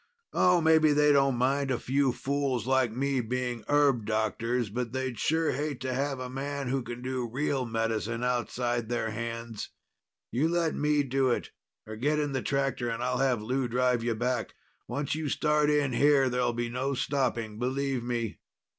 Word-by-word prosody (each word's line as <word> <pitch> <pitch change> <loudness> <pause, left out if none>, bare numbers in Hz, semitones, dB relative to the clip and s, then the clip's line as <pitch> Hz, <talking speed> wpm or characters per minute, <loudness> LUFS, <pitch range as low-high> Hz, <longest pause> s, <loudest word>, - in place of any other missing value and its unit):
Oh, 180 -1 +4
maybe 160 -1 +5
they 150 0 +4
don't 135 -2 +4
mind 135 +3 +1
a 130 - +1
few 135 +2 +1
fools 130 -1 -1
like 130 -2 +2
me 135 +2 0
being 120 0 -3
herb 140 -6 +3
doctors, 110 +1 0
but 120 +1 -3
they'd 130 -2 -3
sure 160 +1 +1
hate 145 0 -3
to 130 -1 -2
have 135 +1 -1
a 130 - -4
man 135 +1 -4
who 135 +1 0
can 120 0 -7
do 130 -2 -2
real 130 0 -1
medicine 115 0 -1
outside 120 -1 -1
their 115 -2 -1
hands. 115 0 -5 0.6
You 150 +7 +1
let 170 -2 +1
me 150 0 +2
do 135 0 +1
it, 120 - -1 0.3
or 110 0 -7
get 145 +6 +1
in 145 -1 0
the 130 -2 -1
tractor 135 -3 -1
and 115 +1 -3
I'll 125 0 0
have 130 -5 +1
Lou 130 +3 0
drive 125 0 +1
you 115 -1 0
back. 120 +1 -2 0.3
Once 140 +3 -2
you 155 -1 -2
start 150 0 +2
in 145 -3 +2
here, 140 0 +4
there'll 125 -1 +1
be 120 0 -2
no 130 +3 -2
stopping. 120 -6 -1
Believe 130 +1 -1
me." 120 -2 -3
130 Hz, 180 wpm, -29 LUFS, 120-140 Hz, 0.6 s, maybe